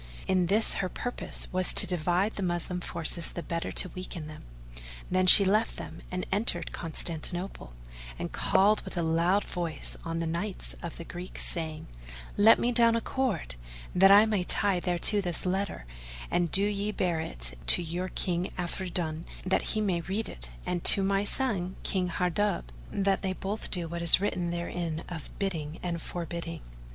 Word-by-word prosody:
In 185 -2 +1
this 215 +4 +2
her 185 - -2
purpose 245 +5 -3
was 185 0 +2
to - - +5
divide 180 +4 0
the 205 - -7
Moslem 180 0 -2
forces 170 0 +2
the 170 - -7
better 165 0 -4
to 185 - +1
weaken 185 -2 -7
them. 155 0 -11 0.7
Then 185 0 +2
she 200 +2 +11
left 215 +4 +1
them; - - -9
and 180 0 -4
entered 200 -4 0
Constantinople, 165 - -4 0.4
and - - -5
called 210 +2 +2
with - - -9
a 170 - 0
loud 170 +5 +1
voice 170 -3 -4
on 165 -1 -4
the 165 - -2
knights 175 +5 -3
of 170 - -7
the 170 - -7
Greeks, 175 +2 -2
saying, 160 -3 -1 0.5
"Let 220 +2 +6
me 245 - 0
down 230 -1 +4
a - - +1
cord 235 - -2 0.4
that 195 +2 +6
I 205 +2 +8
may 210 -4 0
tie 195 0 +1
thereto 180 +4 +1
this 175 -2 -2
letter, 190 - -2 0.5
and 175 -1 +1
do 195 - +4
ye 205 0 -1
bear 175 -5 -1
it - - -4
to 175 - +7
your 175 +3 -3
King 180 0 -2
Afridun, 175 -2 -3 0.2
that 190 - +1 0.2
he - - +1
may 185 -5 0
read 195 +6 -3
it - - -2 0.2
and 175 -1 -3
to 195 - +10
my 195 +1 +1
son 200 -7 -1
King 185 -2 0
Hardub 180 +3 -1 0.3
that 195 -1 0
they 190 -1 -2
both 195 +3 -4
do 175 -3 -1
what 170 +1 -5
is 170 +1 +7
written 180 -3 -2
therein 170 -1 -4
of 165 -4 -7
bidding 165 -5 -4
and 170 -2 -3
forbidding." 170 -1 -6
180 Hz, 175 wpm, -28 LUFS, 170-195 Hz, 0.7 s, she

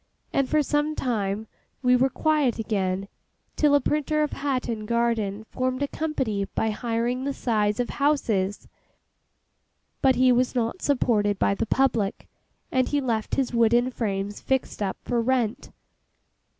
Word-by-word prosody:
And 275 -2 +1
for 305 -1 +3
some 295 +2 0
time 215 -5 -1 0.4
we 250 0 +5
were 260 +2 +3
quiet 300 -2 +1
again, 195 -3 -1 0.5
till 295 -1 +4
a - - +5
printer 305 +2 0
of 300 - -2
Hatton 250 -6 -2
Garden 230 -3 0
formed 255 +4 -2
a - - 0
company 265 -11 -2
by 220 - +1
hiring 235 +3 -1
the 280 0 -2
sides 210 -3 0
of 245 - -1
houses; 220 -9 0 1.3
but 265 -1 +4
he 255 +1 +5
was 250 +1 +2
not 240 +8 -1
supported 215 -7 +1
by - - +2
the 200 - -2
public, 230 -7 +1 0.4
and 255 -1 +2
he 290 - +1
left 230 -5 -1
his 265 -2 -1
wooden 235 +2 +3
frames 205 -4 -3
fixed 265 -4 -1
up 195 -2 -1
for 240 -1 0
rent. 240 -2 0
240 Hz, 150 wpm, -25 LUFS, 215-270 Hz, 1.3 s, we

